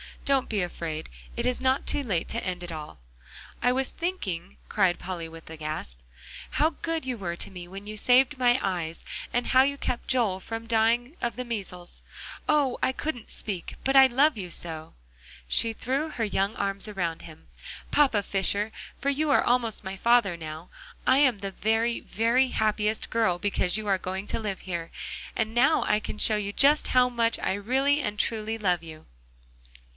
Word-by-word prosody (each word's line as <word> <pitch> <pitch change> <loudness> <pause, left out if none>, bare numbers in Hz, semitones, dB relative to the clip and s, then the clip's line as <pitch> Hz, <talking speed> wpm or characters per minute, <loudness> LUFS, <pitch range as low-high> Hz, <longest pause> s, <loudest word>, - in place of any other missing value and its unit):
Don't 275 -2 +2
be 210 -3 0
afraid; 165 -3 -5 0.3
it - - -1
is 250 - +1
not 260 +1 +2
too 290 - +1
late 195 -11 -1
to 230 - -2
end 180 -1 -3
it 175 - -6
all." 150 - -8 0.6
"I 245 - +4
was 265 +1 0
thinking," 200 - -4
cried 190 -4 +2
Polly 175 -3 -5
with 165 0 -12
a 160 - -8
gasp, 155 - -3 0.5
"how 310 +2 +2
good 330 -3 -2
you 255 -2 -2
were 175 -4 -3
to 175 - -7
me, 180 -2 -8
when 195 +3 -9
you 215 +1 -6
saved 260 +5 +4
my 245 -1 +4
eyes, 170 -4 -2 0.3
and 245 - 0
how 260 - +6
you 280 +1 +1
kept 245 - -3
Joel 230 -8 +2
from 225 +4 -6
dying 235 +6 +2
of 235 - -1
the 250 - -3
measles. 190 -6 -5 0.5
Oh! 290 -4 +2
I 260 - +2
couldn't 260 -5 -4
speak 190 -6 -4
but 270 +1 +1
I 265 0 +9
love 270 +2 +3
you 185 -3 -5
so." 160 -2 -2 0.5
She 225 - +3
threw 270 +7 -1
her 245 -6 -3
young 200 0 0
arms 200 +1 -2
around 175 -6 -3
him. 160 -1 -13 0.4
"Papa 260 -9 +4
Fisher 200 +2 0 0.3
for 280 - 0
you 295 +2 0
are 285 - +5
almost 235 -4 +1
my 190 0 -5
father 235 -3 +4
now 160 +1 -8 0.4
I 260 - +5
am 260 -7 +4
the 195 0 -4
very, 225 +4 +1
very 235 +4 +2
happiest 215 -1 0
girl 220 -6 +2
because 185 0 0
you 215 - -4
are 195 -1 +3
going 190 +2 -4
to - - -2
live 205 -4 -4
here, 170 -3 -5 0.4
and 220 0 -1
now 270 +6 +4
I 210 - +2
can 215 - -6
show 215 0 +3
you 205 -1 -3
just 290 +5 +4
how 250 -1 +4
much 230 -1 +1
I 185 - -1
really 265 +8 +2
and 210 -6 -3
truly 220 0 -1
love 180 -5 +1
you." 160 -2 -11
215 Hz, 190 wpm, -27 LUFS, 185-250 Hz, 0.6 s, I